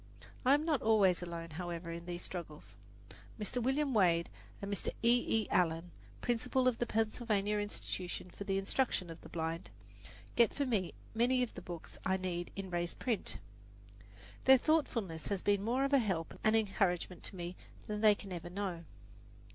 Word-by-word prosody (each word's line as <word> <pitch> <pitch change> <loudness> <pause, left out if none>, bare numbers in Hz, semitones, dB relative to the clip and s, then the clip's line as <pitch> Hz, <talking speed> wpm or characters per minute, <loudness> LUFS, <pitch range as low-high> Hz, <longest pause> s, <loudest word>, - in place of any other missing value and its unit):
I 265 +2 +6
am 300 +2 0
not 305 -6 +2
always 200 -6 +4
alone, 170 -1 -5
however, 170 +1 -4
in 170 +1 -7
these 175 0 -4
struggles. 160 -4 -6 0.6
Mr. 215 +4 -1
William 270 +3 +1
Wade 170 -5 +4 0.3
and 200 0 -3
Mr. 200 - -1
E. 235 -2 +4
E. - - -9
Allen, 165 0 +2 0.3
Principal 245 +2 +1
of 250 -2 +2
the 240 - 0
Pennsylvania 215 -2 +1
Institution 185 -3 -4
for - - -7
the 195 -1 0
Instruction 195 -3 0
of 165 - -10
the - - -11
Blind, 165 +1 -3 0.7
get 235 -3 +4
for 285 - +1
me 210 -8 0 0.2
many 250 +3 +3
of 245 - -4
the - - -7
books 170 -2 -8
I 190 0 +2
need 175 -2 -3
in 195 -2 -5
raised 175 0 -1
print. 200 - -2 1.1
Their 265 0 +9
thoughtfulness 230 - 0
has 200 -2 -2
been 200 -1 +2
more 245 +5 +1
of 275 - -1
a 275 - +7
help 185 -8 -1
and 215 +1 +4
encouragement 190 -4 +1
to - - -6
me 175 0 -5 0.3
than 210 0 -3
they 215 -2 +7
can 195 -2 -8
ever 175 0 -5
know. 180 -3 -3
195 Hz, 175 wpm, -34 LUFS, 175-230 Hz, 1.1 s, Their